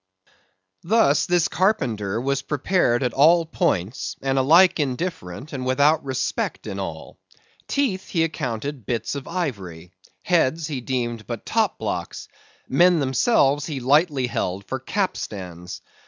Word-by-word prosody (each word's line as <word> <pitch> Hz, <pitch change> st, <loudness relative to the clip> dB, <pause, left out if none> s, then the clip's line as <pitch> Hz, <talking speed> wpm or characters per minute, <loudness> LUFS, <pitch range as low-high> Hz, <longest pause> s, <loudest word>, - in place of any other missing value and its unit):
Thus, 170 Hz, -7 st, +3 dB
this 175 Hz, -2 st, +2 dB
carpenter 115 Hz, -, 0 dB
was 140 Hz, +2 st, -1 dB
prepared 140 Hz, -3 st, +1 dB
at 125 Hz, -2 st, -1 dB
all 165 Hz, +4 st, +5 dB
points, 100 Hz, -, -1 dB
and 135 Hz, 0 st, +1 dB
alike 170 Hz, +7 st, +5 dB
indifferent 140 Hz, -, -4 dB
and 130 Hz, -2 st, -4 dB
without 140 Hz, +5 st, +3 dB
respect 130 Hz, -1 st, -2 dB
in -, -, -5 dB
all. -, -, -7 dB, 0.5 s
Teeth 230 Hz, -10 st, -1 dB
he 165 Hz, -3 st, +1 dB
accounted 135 Hz, -5 st, -4 dB
bits 115 Hz, -2 st, -2 dB
of 140 Hz, -2 st, -6 dB
ivory; 95 Hz, -, -5 dB, 0.3 s
heads 165 Hz, -3 st, +1 dB
he 145 Hz, -5 st, -4 dB
deemed 120 Hz, -3 st, -3 dB
but -, -, -6 dB
top -, -, +1 dB
blocks; -, -, -5 dB, 0.4 s
men 175 Hz, +5 st, +4 dB
themselves 140 Hz, -, +2 dB
he 150 Hz, -4 st, -4 dB
lightly 140 Hz, +1 st, +2 dB
held 100 Hz, -4 st, -3 dB
for 130 Hz, +7 st, -4 dB
capstans. 95 Hz, -, -4 dB
135 Hz, 130 wpm, -23 LUFS, 120-165 Hz, 0.5 s, all